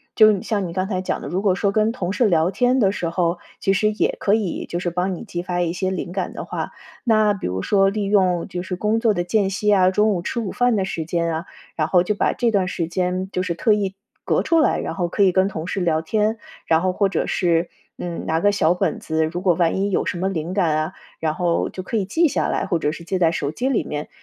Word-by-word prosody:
就 215 -1 +7
你 195 - -2
像 205 -4 -1
你 - - -6
刚 185 +1 -1
才 185 -3 -2
讲 185 - -2
的， - - -6
如 185 +3 -1
果 195 -3 +2
说 195 +1 +1
跟 215 +2 +2
同 190 -6 -3
事 240 +1 +3
聊 170 -1 +2
天 250 +4 +2
的 195 -3 +3
时 175 -4 -3
候， 170 0 0 0.2
其 195 - +1
实 215 +3 +2
也 210 - 0
可 200 - +2
以， 210 -5 -1
就 175 - -3
是 175 - -1
帮 180 +2 -1
你 - - -8
激 175 -4 -4
发 180 -1 -2
一 170 -1 0
些 185 +1 -1
灵 180 -1 -4
感 190 -1 -3
的 - - -6
话， - - -4 0.3
那 215 -3 +3
比 195 - -4
如 95 +1 -2
说 195 - +3
利 205 +1 -2
用 185 -4 +2
就 180 -2 -4
是 185 0 -4
工 210 +5 0
作 225 -2 +3
的 175 -3 -1
间 195 +2 +1
隙 210 +2 0
啊， 185 -2 +5
中 210 +2 +3
午 180 - -1
吃 210 - -3
午 215 -5 -3
饭 245 -1 +2
的 195 -2 0
时 165 -4 -3
间 170 0 -1
啊， 160 +2 -3 0.3
然 155 -1 0
后 180 0 +4
就 210 - 0
把 - - +1
这 235 -2 +1
段 195 -4 +1
时 170 -2 -2
间， 185 +2 -1
就 185 - -1
是 175 -2 -1
特 215 +3 +3
意 195 -2 -1 0.3
隔 - - +1
出 330 -1 +3
来， - - +2
然 - - -3
后 175 -3 -1
可 200 +4 +1
以 185 - +5
跟 190 +1 +3
同 160 -5 -5
事 195 - -2
聊 160 -2 +1
天。 215 +6 0 0.3
然 160 0 +3
后 185 -1 +1
或 200 0 +1
者 175 - -1
是， 170 -1 +1 0.3
嗯， 175 -1 -5
拿 160 0 +1
个 205 +4 +3
小 175 -4 +2
本 180 -3 -1
子， 160 0 0
如 175 +3 -4
果 180 -4 +3
万 170 0 +1
一 200 - +1
有 190 - 0
什 175 - -2
么 190 +2 0
灵 170 0 -3
感 170 -6 +2
啊， 155 +4 -2 0.3
然 155 -1 0
后 175 0 0
就 185 - -6
可 220 +4 -3
以 195 - 0
记 330 - +2
下 - - 0
来， - - -1
或 175 - +1
者 150 -2 0
是 170 - -8
记 185 +2 -2
在 165 -2 +3
手 145 -4 -2
机 245 +12 -2
里 270 - +1
面。 150 0 -5
185 Hz, 300 characters per minute, -22 LUFS, 170-205 Hz, 0.3 s, 就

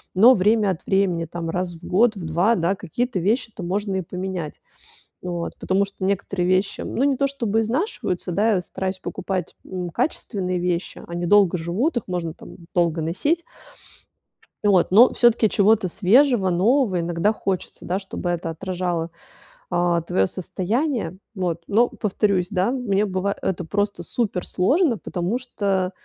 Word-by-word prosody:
но 230 +7 +8
время 210 +2 +3
от 180 0 -6
времени, 190 -4 +1
там, 165 0 -5
раз 180 +1 -2
в 165 - -16
год, 215 +4 +3
в 185 - -6
2, 175 +8 +2
да, 180 0 +1
какие-то 230 - -3
вещи-то 220 +2 -1
можно 195 +2 -2
и 190 - 0
поменять. 180 -3 -5 0.6
Вот, 175 -2 -4
потому 195 +2 +1
что 195 -1 -7
некоторые 195 -2 -1
вещи, 185 +2 +1
ну, 250 - -2
не 280 -2 +2
то 275 +2 +2
чтобы 230 -6 -1
изнашиваются, 225 - -2
да, 215 +5 +2
я 180 - +1
стараюсь 185 +1 -4
покупать, 185 -3 -4
м, 180 -2 -5
качественные 190 - -2
вещи, 175 0 -2
они 175 0 -3
долго 195 -2 +5
живут, 200 - -1
их 235 - -1
можно 175 -3 -2
там - - -13 0.2
долго 170 -2 +2
носить. 285 - 0 1.2
Вот, 195 -4 +3
но 225 +6 +7
всё-таки 235 -2 +4
чего-то 205 -1 +3
свежего, 220 - +4
нового 200 +2 +2
иногда 175 +5 +1
хочется, 195 -4 -4
да, 185 +2 -1
чтобы 190 -2 -5
это 175 -1 -2
отражало, 175 -1 -3 0.6
а, 175 -1 +1
твоё 95 - +1
состояние. 190 - -2 0.2
Вот. 175 -3 -1
Но, 230 +4 +4
повторюсь, 200 -3 0
да, 195 +3 +1
мне 215 -6 0
быва 195 0 -1
это 185 -2 -2
просто 205 +4 -1
суперсложно, 235 - 0
потому 185 +5 -2
что 200 -7 -1
190 Hz, 155 wpm, -23 LUFS, 175-220 Hz, 1.2 s, но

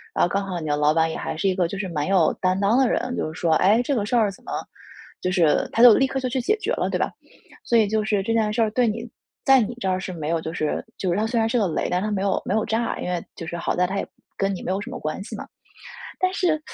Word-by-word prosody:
然 - - +3
后 175 - +3
刚 200 +1 -1
好 180 -3 -4
你 155 - -5
的 145 0 +1
老 150 +1 +3
板 160 0 +2
也 - - -4
还 - - -4
是 195 - -1
一 - - +1
个， 180 -3 +1
就 195 - -6
是 190 -1 -3
蛮 150 -1 -2
有 190 -4 +4
担 185 0 +1
当 205 +5 +3
的 260 -3 +4
人， 250 0 -1
就 155 - -2
是 - - -11
说 165 -2 +2
“诶， 215 +6 +4
这 280 - -1
个 210 -5 0
事 245 - -1
儿 215 -4 +3
怎 - - -16
么” - - -7 0.7
就 185 - 0
是， 170 -5 +3
他 230 - +4
就 240 -3 +10
立 270 - +3
刻 270 - -2
就 255 - -1
去 260 +1 -1
解 425 - +1
决 430 - -3
了， - - -1
对 - - 0
吧？ - - -1 0.5
所 235 - +3
以 215 -2 +4
就 215 0 +1
是 205 -3 +1
这 230 - -2
件 215 -2 +2
事 230 - +1
儿 215 -1 +2
对 245 +1 +2
你 225 +2 -2 0.4
在 270 -1 +6
你 235 +1 -1
这 190 - 0
儿 185 0 0
是 185 -1 -5
没 155 -2 -4
有 165 -1 +1
就 160 0 -5
是 155 -1 -2
就 185 -2 -1
是 175 - 0
它 220 +1 +1
虽 235 0 -1
然 225 - +3
是 240 - +1
个 200 - +2
雷， 160 - -1
但 180 +1 +1
它 215 - -1
没 195 -2 -1
有 195 -1 0
没 - - -1
有 220 0 +2
炸， 230 +1 -1
因 - - -3
为 175 -2 -1
就 165 - -7
是 170 +2 -5
好 - - -1
在 180 0 +2
它 195 +2 -3
也 - - -2 0.3
跟 195 0 0
你 - - -8
没 - - -2
有 190 - 0
什 235 +5 -7
么 260 - -6
关 155 +5 -4
系 - - -7
嘛。 - - -7 0.7
但 370 0 +2
是 325 -5 +1
200 Hz, 350 characters per minute, -23 LUFS, 180-230 Hz, 0.7 s, 就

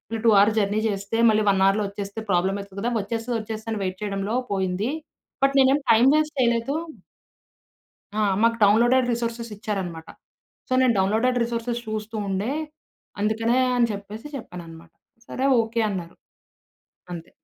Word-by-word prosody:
ఈ - - -1
2 230 - +7
hours 215 +2 +4
journey 205 +1 +1
జేస్తే 200 +2 -3
మళ్ళీ 215 0 +3
1 190 -1 +3
అవర్‌లో 200 +2 +3
వచ్చేస్తే 200 +1 -6
ప్రాబ్లమయితది 195 +2 -1
గదా! 240 +3 -1
వచ్చేస్తది 230 +3 -3
వచ్చేస్తది 220 +1 -6
అని 205 - -3
వెయిట్ 185 0 -3
చేయడంలో 200 +2 -2 0.2
పోయింది. 190 +5 -1 0.5
బట్ 275 0 +4
నేనేం 270 +2 +5
టైం 230 +3 +5
వేస్ట్ 305 0 0
చేయలేదు. 235 +2 +1 1.4
ఆ! - - +2 0.2
మాకు 230 0 +3
డౌన్‌లోడెడ్ 240 +5 +4
రిసోర్సెసిచ్చారనమాట. 210 -7 -4 0.6
సో - - -21
నేను 250 -2 +4
డౌన్‌లోడెడ్ 225 +6 +2
రిసోర్సెస్ 235 0 -3
చూస్తూ 215 +1 -4
ఉండే 200 +7 -1 0.7
అందుకనే 225 +4 +1 0.2
అని 235 -1 +3
చెప్పేసి 205 +6 -8
చెప్పాననమాట 170 -8 -10 0.4
"సరే 265 - -2 0.2
ఓకే." 225 +1 -3
అన్నారు. 175 -4 -5 1.0
అంతే. 170 -1 -8
215 Hz, 140 wpm, -24 LUFS, 195-235 Hz, 1.4 s, 2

